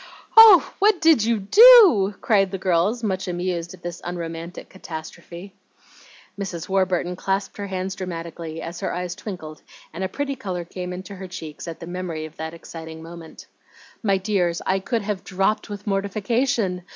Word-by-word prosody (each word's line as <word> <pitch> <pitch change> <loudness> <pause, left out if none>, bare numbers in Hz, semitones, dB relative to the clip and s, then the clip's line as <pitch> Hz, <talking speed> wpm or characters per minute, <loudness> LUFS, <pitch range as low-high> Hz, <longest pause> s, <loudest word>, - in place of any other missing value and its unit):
"Oh, 445 -6 +9
what 415 -2 +4
DID 320 -9 +4
you 230 -1 +1
do?" 365 - +7
cried 195 -3 +3
the 195 - -4
girls, 190 +6 0
much 190 -3 -2
amused 175 -1 -3
at - - -24
this 175 -1 -6
unromantic 170 0 -6
catastrophe. 170 +1 -9 0.9
Mrs. 180 -5 -5
Warburton 185 -2 0
clasped 195 +2 -2
her 200 -1 -5
hands 190 0 -3
dramatically, 165 -3 -6
as 170 +1 -7
her - - -3
eyes 180 -1 -4
twinkled 160 -7 -8 0.3
and 175 +4 -5
a 190 - -2
pretty 280 +5 -3
color 185 -9 -5
came 180 +1 -6
into 185 +2 -8
her 190 0 -7
cheeks 160 -3 -8
at 165 - -7
the - - -8
memory 175 -3 -5
of 155 0 -13
that 160 +1 -6
exciting 160 -1 -10
moment. 165 -1 -11 0.6
"My 200 -3 +2
dears, 185 -4 0
I 190 +1 +1
could 225 +3 -2
have 200 -2 -3
dropped 195 +4 -1
with 205 -1 -7
mortification! 200 0 -1
185 Hz, 165 wpm, -23 LUFS, 170-205 Hz, 0.9 s, Oh